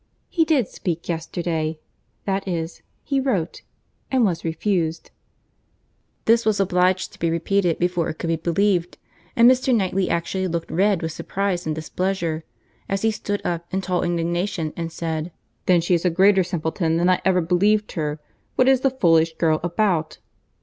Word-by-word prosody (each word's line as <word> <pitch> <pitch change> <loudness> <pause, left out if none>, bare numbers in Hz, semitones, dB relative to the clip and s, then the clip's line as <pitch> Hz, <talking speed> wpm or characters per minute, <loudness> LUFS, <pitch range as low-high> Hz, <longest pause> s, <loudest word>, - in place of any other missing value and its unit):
He 330 -2 +2
did 285 - +2
speak 170 -2 -4
yesterday—that 165 +3 -4
is, 170 -2 -3 0.2
he 275 -2 0
wrote, 200 -11 -1 0.5
and 255 -3 +3
was 175 -5 -1
refused." 165 0 -1 1.1
This 230 +1 +4
was 215 -2 +1
obliged 185 -1 +1
to - - -16
be 165 - +1
repeated 170 +1 +1
before 175 -1 0
it - - -4
could 165 - -4
be 165 - +2
believed; 175 +2 0 0.4
and 235 0 +7
Mr. 255 0 +4
Knightley 190 -2 0
actually 185 +3 -1
looked 170 -1 -3
red 195 0 +2
with 160 - -2
surprize 185 0 -2
and 155 - -1
displeasure, 165 0 -2 0.5
as 195 +1 -1
he 225 - +3
stood 205 -1 -3
up, 170 -1 -2
in 190 - -1
tall 180 -2 -1
indignation, 170 -1 -1
and 165 -1 -4
said, 165 0 -3 0.4
"Then 180 -2 +5
she 175 +2 +1
is 170 - +2
a 180 - +3
greater 190 +2 +4
simpleton 165 -1 -1
than 175 +1 +2
I 185 0 +3
ever 185 -1 +3
believed 205 +5 +2
her. 150 -2 -3 0.4
What 255 - +3
is 265 -1 +4
the 270 - +3
foolish 165 -10 +3
girl 160 -2 +2
about?" 175 -2 0
175 Hz, 165 wpm, -22 LUFS, 165-200 Hz, 1.1 s, and